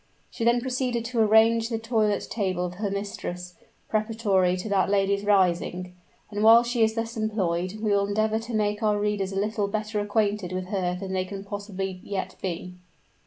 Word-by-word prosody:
She - - -4
then 240 +1 +3
proceeded 250 -2 -1
to 235 0 -2
arrange 225 +1 +4
the 230 - -1
toilet 220 -2 0
table 185 -5 -1
of 180 - -5
her 205 - 0
mistress, 195 -3 -5 0.3
preparatory 215 -4 +1
to 185 - -5
that 195 -3 +2
lady's 200 0 +1
rising; 180 -2 +1 0.4
and 205 0 -2
while 230 +2 +8
she 240 -1 +1
is 220 0 +2
thus 225 +1 -3
employed, 185 -5 -1
we 215 -1 0
will 200 0 +2
endeavor 215 +2 +1
to 230 0 -5
make 210 0 0
our 210 -1 +2
readers 205 -2 -1
a - - -5
little 210 0 0
better 215 +1 -2
acquainted 205 -3 0
with 185 0 -4
her 180 -3 -1
than 190 -1 -5
they 185 -1 0
can 195 +1 -7
possibly 195 -2 -5
yet 190 -2 -4
be. 180 0 -4
205 Hz, 185 wpm, -26 LUFS, 190-220 Hz, 0.4 s, while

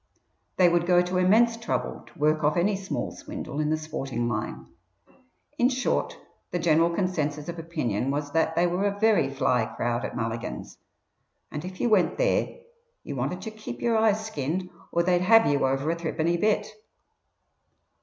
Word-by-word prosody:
They 180 - +6
would 175 0 +2
go 180 -1 +5
to 180 +1 -1
immense 225 +6 +4
trouble 230 - -3
to - - -18
work 155 +1 +2
off 150 +3 +2
any 195 +4 +2
small 195 0 -4
swindle 140 - -7
in 150 0 0
the 155 - +1
sporting 140 -6 -3
line. 105 - -3 0.9
In 245 - +5
short 260 -1 -1 0.3
the - - -2
general 165 0 +3
consensus 155 -5 -2
of 170 -1 -5
opinion 135 - -2
was 145 +1 -2
that 160 +2 +1
they 175 - +3
were 180 +3 0
a 200 0 -1
very 220 -10 +3
"fly" 130 -4 +1
crowd 120 0 -1
at - - -4
Mulligan's, 115 - -5 0.7
and 150 - -5
if 185 0 -8
you - - +1
went 210 -5 +3
there - - 0 0.4
you 145 - -6
wanted 140 +9 -3
to 220 - -5
"keep 215 - -8
your 235 -1 +1
eyes 220 -1 +2
skinned" 180 -1 -3 0.2
or 170 - +2
they'd 175 0 +2
"have" 225 +4 +6
you 140 -2 +2
over 135 +4 0
a - - -1
threepenny 170 0 -1
bit. 210 +2 +1
170 Hz, 175 wpm, -26 LUFS, 145-195 Hz, 0.9 s, They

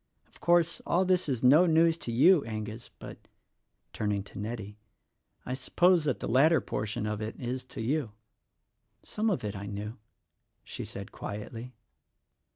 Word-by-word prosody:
Of - - -22
course, 170 -1 +3
all 185 +2 +2
this 185 -3 +2
is 125 -3 -2
no 150 +8 +7
news 165 0 +4
to 120 - -5
you, 150 +7 +5
Angus, 110 +1 -6
but," - - -11 0.7
turning 105 -2 -1
to 100 - -10
Nettie, 105 -1 -6 0.7
"I 125 - -3
suppose 170 +6 +3
that 140 -5 0
the - - -4
latter 150 +7 +5
portion 105 0 -3
of 105 0 -3
it 110 +1 -5
is 125 +1 -3
to 125 -3 -7
you." 130 0 -1 0.9
"Some 220 +1 -1
of 190 - -1
it 105 -1 -3
I 100 +1 -6
knew," 105 +2 -6 0.6
she - - -7
said 100 0 -8
quietly. 115 +4 -7
125 Hz, 160 wpm, -29 LUFS, 105-160 Hz, 0.9 s, no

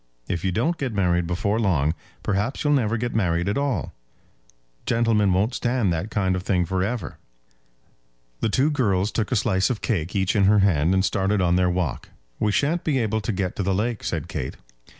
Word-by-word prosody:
If 85 -2 -3
you 95 - +1
don't 155 - 0
get 130 -6 -3
married 90 -3 +1
before 100 +5 0
long, 80 -8 +2 0.3
perhaps 105 +6 -1
you'll 145 -1 +3
never 115 -5 +1
get 120 +1 -3
married 90 -4 +1
at 100 - 0
all. 140 -2 -1 0.9
Gentlemen 115 -4 +2
won't 100 +7 +1
stand 120 -8 0
that 85 +6 -3
kind 95 -3 0
of 90 - -2
thing 90 -1 +1
for 95 +1 -1
ever." 110 -2 -4 1.2
The - - 0
two 135 +8 +2
girls 105 -8 +1
took 110 +1 -2
a - - +2
slice 100 -2 +2
of 120 -5 -2
cake 90 -5 -1
each 95 +1 +1
in 100 -2 +4
her 105 +2 +5
hand, 85 -1 +2
and 95 0 +2
started 100 +2 +1
on 90 -1 +2
their 90 0 +3
walk. 90 -5 -2 0.3
"We 105 - +1
shan't 150 +10 +1
be 150 -4 +1
able 110 -2 0
to 110 - -2
get 95 -2 -2
to - - -1
the 95 0 0
lake," 115 +3 -2
said - - -3
Kate. - - -4
100 Hz, 205 wpm, -24 LUFS, 90-115 Hz, 1.2 s, her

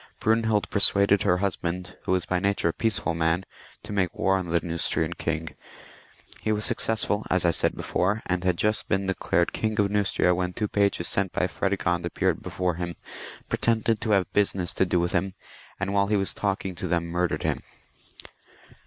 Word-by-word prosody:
Brunehild 110 -1 +1
persuaded 100 -1 +4
her 90 -3 +2
husband, 90 -1 -3
who - - -1
was 90 -2 0
by 90 - 0
nature 100 -2 +1
a - - -2
peacefal 105 -6 +1
man, 80 +3 +1 0.4
to - - -7
make 95 -3 0
war 95 - +2
on 90 -2 -2
the 85 0 +2
Keustrian 85 -1 0
king: 80 0 -3 0.9
he 110 - -1
was 105 0 +1
successful, 110 -3 +1
as 95 -1 +1
I 85 - +5
said - - 0
before, 100 +5 -1
and 90 -1 -1
had 90 -2 +1
just 105 +3 0
been 95 -1 +1
declared 90 -2 0
King 110 0 -1
of 100 -1 +2
Neustria 100 -3 +2
when 90 0 -2
two 105 - -2
pages 100 -4 +1
sent 95 +4 +1
by - - +1
Prede 100 +2 -1
gond 85 -2 0
appeared 85 - -1
before 90 -1 -2
him, 85 0 -3 0.5
pretended 115 -1 +1
to - - -2
have 95 -5 +2
business 95 -3 +1
to 95 - +1
do 90 - +1
with 85 +1 0
him, 95 +1 -1 0.4
and 100 0 -2
whfle 100 0 +2
he 105 - +3
was 95 -1 -1
talking 95 -2 -2
to 85 - -4
them 85 -1 0
murdered 85 +1 -1
him. - - -1
95 Hz, 190 wpm, -26 LUFS, 85-100 Hz, 0.9 s, I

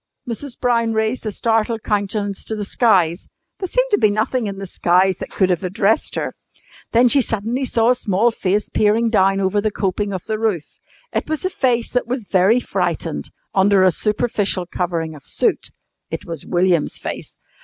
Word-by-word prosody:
Mrs. 240 +3 -5
Brown 230 -2 +1
raised 220 +2 -1
a - - -1
startled 225 +1 0
countenance 205 -1 -1
to 220 - -3
the 210 -1 -4
skies. 185 -6 +2 0.3
There 375 - -3
seemed - - +1
to 410 - +3
be 215 - +4
nothing 220 +3 0
in 195 -1 -5
the 195 - -5
skies 185 +1 +2
that - - -6
could 190 -2 +1
have 180 +1 -1
addressed 195 +4 +1
her. - - -2 0.6
Then 240 +2 +5
she 275 +3 +4
suddenly 230 +4 -1
saw 230 -1 +3
a - - +6
small 230 -1 +1
face 205 -1 -1
peering 220 +2 +2
down 195 -2 +3
over 195 +1 +1
the 215 - +1
coping 200 0 -2
of 185 -3 -4
the 215 -1 -2
roof. 210 -9 0 0.5
It - - -2
was 315 +3 -2
a 370 - 0
face 240 -6 0
that 250 - 0
was 250 0 -2
very 195 +4 +3
frightened, - - -2 0.2
under 195 0 +4
a 185 - +5
superficial 205 -1 0
covering 170 -3 -3
of 145 -3 -14
soot. - - 0 0.4
It - - -5
was 165 -4 -6
William's 175 -3 +1
face. - - -7
210 Hz, 185 wpm, -20 LUFS, 190-230 Hz, 0.6 s, a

